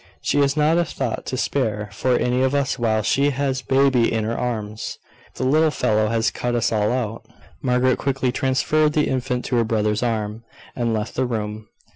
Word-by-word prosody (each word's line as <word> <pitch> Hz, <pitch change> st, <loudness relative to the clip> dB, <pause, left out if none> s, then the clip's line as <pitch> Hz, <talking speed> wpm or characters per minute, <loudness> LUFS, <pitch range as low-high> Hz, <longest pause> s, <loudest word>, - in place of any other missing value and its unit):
She -, -, 0 dB
has 140 Hz, +1 st, +2 dB
not 155 Hz, +3 st, +3 dB
a -, -, +3 dB
thought 130 Hz, -7 st, -4 dB
to 130 Hz, -, -2 dB
spare 110 Hz, -6 st, -1 dB
for 125 Hz, +5 st, +1 dB
any 125 Hz, +1 st, +1 dB
of 130 Hz, +1 st, +2 dB
us 140 Hz, -2 st, 0 dB
while 110 Hz, -2 st, +1 dB
she 140 Hz, +6 st, +2 dB
has 135 Hz, -1 st, -1 dB
baby 135 Hz, -3 st, +3 dB
in 110 Hz, -1 st, 0 dB
her 115 Hz, +2 st, -2 dB
arms. 110 Hz, -3 st, -4 dB, 0.4 s
The -, -, -3 dB
little 155 Hz, +5 st, +4 dB
fellow 110 Hz, -7 st, +1 dB
has 115 Hz, +1 st, +1 dB
cut 120 Hz, 0 st, -2 dB
us 120 Hz, -, +1 dB
all 105 Hz, -1 st, +1 dB
out." 115 Hz, -3 st, -3 dB, 0.3 s
Margaret 125 Hz, 0 st, +2 dB
quickly 135 Hz, -2 st, 0 dB
transferred 150 Hz, +4 st, +1 dB
the 150 Hz, -1 st, +2 dB
infant 125 Hz, -1 st, -2 dB
to 125 Hz, -, 0 dB
her 115 Hz, -, +3 dB
brother's 110 Hz, -1 st, 0 dB
arm, 110 Hz, -2 st, -2 dB, 0.3 s
and 120 Hz, -2 st, 0 dB
left 110 Hz, 0 st, -2 dB
the 130 Hz, 0 st, 0 dB
room. 110 Hz, -2 st, -4 dB
125 Hz, 195 wpm, -22 LUFS, 110-135 Hz, 0.4 s, little